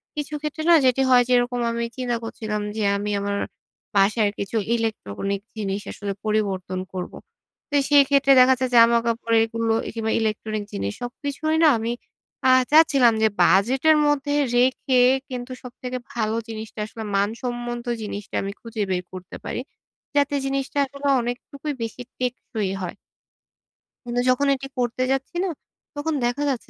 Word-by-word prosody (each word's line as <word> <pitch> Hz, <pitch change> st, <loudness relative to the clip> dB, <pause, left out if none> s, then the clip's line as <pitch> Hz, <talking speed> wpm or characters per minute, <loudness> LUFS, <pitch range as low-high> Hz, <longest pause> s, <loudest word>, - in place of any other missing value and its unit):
কিছু 295 Hz, 0 st, -4 dB
ক্ষেত্রে 305 Hz, +1 st, -4 dB
না -, -, +9 dB
যেটি 255 Hz, +1 st, +3 dB
হয় 250 Hz, -1 st, +6 dB
যেরকম 245 Hz, 0 st, +2 dB
আমি 235 Hz, 0 st, -2 dB
চিন্তা 245 Hz, -2 st, -1 dB
করছিলাম 215 Hz, -2 st, -4 dB
যে, 220 Hz, -, -1 dB
আমি 205 Hz, +1 st, -3 dB
আমার 200 Hz, 0 st, -2 dB, 0.6 s
বাসার 205 Hz, +2 st, +3 dB
কিছু 200 Hz, +3 st, -2 dB, 0.2 s
ইলেকট্রনিক 200 Hz, -, -3 dB, 0.2 s
জিনিস 200 Hz, -1 st, -2 dB
আসলে 200 Hz, -1 st, -4 dB
পরিবর্তন 195 Hz, -4 st, -1 dB
করবো। 180 Hz, -1 st, -5 dB, 0.5 s
তো 290 Hz, -, -2 dB
সেই 285 Hz, -1 st, +7 dB
ক্ষেত্রে 275 Hz, -1 st, +4 dB
দেখা 255 Hz, +1 st, +7 dB
যায় 255 Hz, -, 0 dB
যে, -, -, 0 dB
জামাকাপড় 230 Hz, 0 st, +4 dB
এগুলো 225 Hz, 0 st, -1 dB
এ -, -, -3 dB
কিংবা 220 Hz, -1 st, -1 dB
ইলেকট্রনিক 215 Hz, -1 st, -2 dB
জিনিস 100 Hz, +1 st, -3 dB
সবকিছুই 285 Hz, +5 st, -3 dB
না 320 Hz, -, +8 dB
আমি 225 Hz, +1 st, -2 dB, 0.6 s
আ -, -, +6 dB, 0.2 s
চাচ্ছিলাম 285 Hz, -7 st, +6 dB
যে, 220 Hz, -, +5 dB
বাজেটের 260 Hz, -, +4 dB
মধ্যে 290 Hz, 0 st, +1 dB, 0.2 s
রেখে 255 Hz, +1 st, +3 dB, 0.3 s
কিন্তু 250 Hz, 0 st, -6 dB
সবথেকে 250 Hz, 0 st, -6 dB, 0.2 s
ভালো 220 Hz, -2 st, -1 dB
জিনিসটা 220 Hz, -1 st, -7 dB
আসলে 220 Hz, +1 st, -8 dB
মান 200 Hz, +1 st, +2 dB
সম্বন্ধ 240 Hz, -1 st, -4 dB, 0.2 s
জিনিসটা 205 Hz, -1 st, -6 dB
আমি 195 Hz, 0 st, -3 dB
খুঁজে 230 Hz, -2 st, -5 dB
বের 180 Hz, -1 st, 0 dB
করতে 185 Hz, -1 st, -8 dB
পারি। -, -, -3 dB, 0.5 s
যাতে 285 Hz, 0 st, +2 dB
জিনিসটা 275 Hz, +1 st, -2 dB
আসলে 280 Hz, +1 st, -5 dB
অনেকটুকুই 270 Hz, +5 st, -5 dB
বেশি 230 Hz, +2 st, -5 dB, 0.2 s
টেকসই 235 Hz, -5 st, -2 dB
হয়। 180 Hz, -, -5 dB, 1.1 s
কিন্তু 245 Hz, 0 st, -2 dB
যখন 265 Hz, +3 st, +3 dB
এটি 270 Hz, 0 st, -7 dB
করতে 245 Hz, +1 st, 0 dB
যাচ্ছি 270 Hz, +5 st, -2 dB
না, 385 Hz, -, 0 dB, 0.5 s
তখন 315 Hz, +2 st, -2 dB
দেখা 245 Hz, +4 st, -1 dB
যাচ্ছে 260 Hz, -4 st, -3 dB
240 Hz, 155 wpm, -23 LUFS, 215-265 Hz, 1.1 s, না